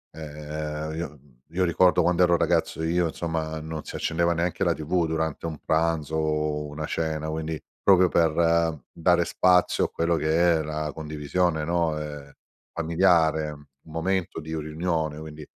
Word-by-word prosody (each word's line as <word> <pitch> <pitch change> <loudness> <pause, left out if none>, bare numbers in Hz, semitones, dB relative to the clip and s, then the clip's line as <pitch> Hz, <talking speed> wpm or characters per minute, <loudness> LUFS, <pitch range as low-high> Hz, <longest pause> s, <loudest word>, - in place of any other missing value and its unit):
Ehm, 75 0 -5
io 85 +1 -3
mhmm, 70 -1 -20 0.2
io 90 +1 +1
ricordo 90 +1 +4
quand'ero 90 0 +4
ragazzo 85 -1 +1
io 85 +1 +1
insomma 80 -1 -3
non 80 0 -6
si - - -8
accendeva 85 +1 +1
neanche 85 +1 -1
la - - +3
TV 85 +3 0
durante 80 -1 -2
un 80 -2 -5
pranzo 80 -1 0
o 75 -1 0
una 75 +1 -5
cena, 80 0 -2
quindi 80 0 -3 0.2
proprio 95 -2 +5
per 85 -1 +2
dare 85 +1 +2
spazio 90 +1 +3
a - - -4
quello 85 +1 0
che 80 +2 +3
è 80 - +1
la 75 0 -3
condivisione, 80 +2 -1
no, 85 -1 0
ehm, 75 -2 -7 0.4
familiare 80 -2 +2
un 75 -1 -12 0.3
momento 90 +3 -1
di 80 0 -8
u 80 - -2
riunione. 80 0 -2
Quindi, 75 -1 -9
80 Hz, 160 wpm, -26 LUFS, 75-85 Hz, 0.4 s, proprio